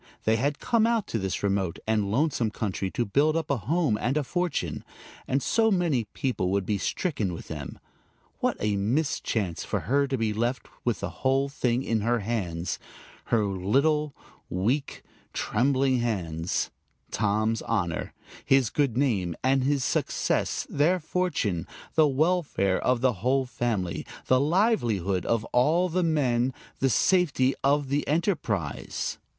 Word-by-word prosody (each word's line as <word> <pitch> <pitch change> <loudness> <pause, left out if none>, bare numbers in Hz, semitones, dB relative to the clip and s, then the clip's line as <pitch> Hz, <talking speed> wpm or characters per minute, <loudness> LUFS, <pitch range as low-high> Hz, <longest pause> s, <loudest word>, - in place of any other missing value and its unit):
They 110 +1 +3
had 140 +4 0
come 230 -2 +2
out 230 -3 +1
to 115 - -1
this 95 0 -3
remote 95 -4 0
and 110 -2 +1
lonesome 125 -1 +1
country 100 -3 -3
to 120 - -1
build 150 +9 +2
up 160 -3 -2
a 140 - +2
home 140 -3 0
and 130 +5 +1
a 150 - +1
fortune; 155 - -2 0.4
and 135 +1 0
so 225 0 +3
many 170 - +1
people 105 -3 -2
would 100 0 0
be 105 0 0
stricken 110 - -1
with 85 - -9
them! 75 -4 -6 0.6
What - - 0
a 105 -1 0
mischance 105 - -1
for - - -2
her 140 +3 +1
to 135 -1 -1
be 110 -2 0
left 120 +4 -1 0.2
with 120 -4 -1
the - - -3
whole 135 +1 +2
thing 125 -2 0
in 115 -4 0
her 120 +1 +1
hands, 90 -6 -2 0.5
her 115 -2 +2
little, 140 +11 +1 0.3
weak, 120 +11 -1 0.3
trembling 130 0 +1
hands 90 -8 -1 0.4
Tom's 110 +2 +1
honor, 90 -8 -2 0.3
his 135 -5 +3
good 140 -6 +1
name 100 - +1
and 135 0 +3
his 140 0 +1
success, - - 0
their 170 +6 +2
fortune, 150 - -1 0.3
the 155 -1 +5
welfare 145 - +1
of 125 -2 +2
the 130 -1 +3
whole 130 +3 +2
family, 110 -8 -2 0.2
the 130 - +4
livelihood 125 - +1
of 115 -1 +1
all 160 +9 +3
the 180 +2 0
men, 130 -6 +1 0.2
the 135 - +2
safety 140 - +3
of 140 0 +2
the 145 +2 0
enterprise! 140 - -1
125 Hz, 150 wpm, -27 LUFS, 105-145 Hz, 0.6 s, the